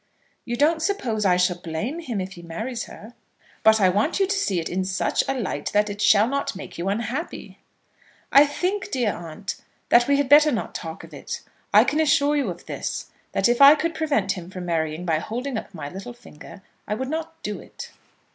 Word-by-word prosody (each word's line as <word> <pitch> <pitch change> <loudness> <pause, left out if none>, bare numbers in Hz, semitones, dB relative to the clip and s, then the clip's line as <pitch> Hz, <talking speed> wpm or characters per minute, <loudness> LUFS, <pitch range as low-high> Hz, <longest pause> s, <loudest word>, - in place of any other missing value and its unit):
"You 240 - -2
don't 315 +5 +2
suppose 250 - -1
I 180 -1 +4
shall 180 0 +1
blame 175 - -4
him 245 -11 -4
if 185 0 -4
he 180 -3 -11
marries 220 +9 -5
her." 220 +3 -12 0.5
"But 220 0 +5
I 190 -2 +5
want 210 - +1
you 390 - +4
to 400 +2 -1
see 200 - 0
it 165 - -3
in 190 +1 -1
such 190 0 0
a 270 - 0
light 190 - -3
that 210 0 +2
it 205 0 -6
shall 205 +1 +5
not 275 -3 -2
make 190 - -9
you 180 +3 -1
unhappy." 235 - -4 0.7
"I 280 +2 +7
think, 365 +7 -2
dear 240 -6 0
aunt, 175 +4 -6 0.3
that 240 0 +5
we 280 0 +3
had 285 -1 +1
better 295 +2 +7
not 230 - -3
talk 165 -1 -6
of - - -13
it. - - -6 0.3
I - - +7
can 305 - 0
assure 295 -1 +3
you 280 -8 0
of 175 - -8
this, - - -5 0.2
that - - +3
if 240 +2 +1
I 280 +2 +10
could 330 +2 -2
prevent 285 -12 0
him 180 -3 -6
from 185 -1 -7
marrying 160 0 -2
by 160 -3 +1
holding 245 - -4
up - - -5
my 155 -6 -7
little 195 +10 -8
finger, 195 -4 -14 0.2
I 210 - -1
would 260 +4 -4
not 325 +1 -4
do 210 - -4
it." - - -10
220 Hz, 215 wpm, -24 LUFS, 185-285 Hz, 0.7 s, I